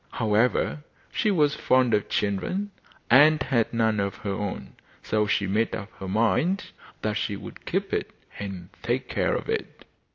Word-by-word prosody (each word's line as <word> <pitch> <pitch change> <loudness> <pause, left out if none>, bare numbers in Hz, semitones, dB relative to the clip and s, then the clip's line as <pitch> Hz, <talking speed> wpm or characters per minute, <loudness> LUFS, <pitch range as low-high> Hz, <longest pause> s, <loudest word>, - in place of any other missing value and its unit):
However, 115 +6 +1 0.3
she 215 - +1
was 150 -7 +3
fond 130 -4 +3
of 105 - +1
children 180 - -1 0.4
and 150 +5 +7
had 115 -5 +1
none 110 -2 +1
of 100 0 -1
her 100 - 0
own, 95 -10 -4 0.3
so 105 -1 +1
she 100 - +1
made 105 +4 +1
up 105 -3 -7
her 95 - -5
mind 120 - +1 0.3
that 110 - 0
she 105 -1 -2
would - - -10
keep - - -1
it - - 0 0.3
and 95 -3 -6
take - - -1
care - - 0
of - - -4
it. - - -4
110 Hz, 165 wpm, -26 LUFS, 100-130 Hz, 0.4 s, and